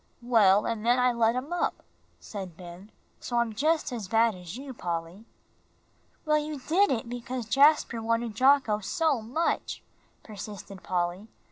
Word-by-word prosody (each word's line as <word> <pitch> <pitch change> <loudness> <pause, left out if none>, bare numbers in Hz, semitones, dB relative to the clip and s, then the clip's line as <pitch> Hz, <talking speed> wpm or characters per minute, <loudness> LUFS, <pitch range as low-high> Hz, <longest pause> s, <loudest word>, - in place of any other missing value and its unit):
"Well, 210 -5 +4
and 230 -2 -2
then 240 +2 +3
I 250 0 +3
let 230 0 +2
him 270 +7 -4
up," 350 - -1 0.4
said 190 -5 -8
Ben, 180 +3 -11 0.3
"so 240 - -3
I'm 235 -2 +1
just 310 +5 +1
as 225 -6 -5
bad 225 +2 +3
as 180 +2 -9
you, 270 0 -8
Polly." 175 0 -5 1.0
"Well, 305 0 +3
you 300 0 -4
did 365 +9 +2
it 235 -3 -1
because 245 0 -5
Jasper 275 -1 +4
wanted 230 0 -1
Jocko 260 -4 +3
so 295 - 0
much," 260 +10 -2 0.4
persisted 200 -2 -9
Polly. 180 +3 -2
230 Hz, 150 wpm, -28 LUFS, 205-265 Hz, 1.0 s, Well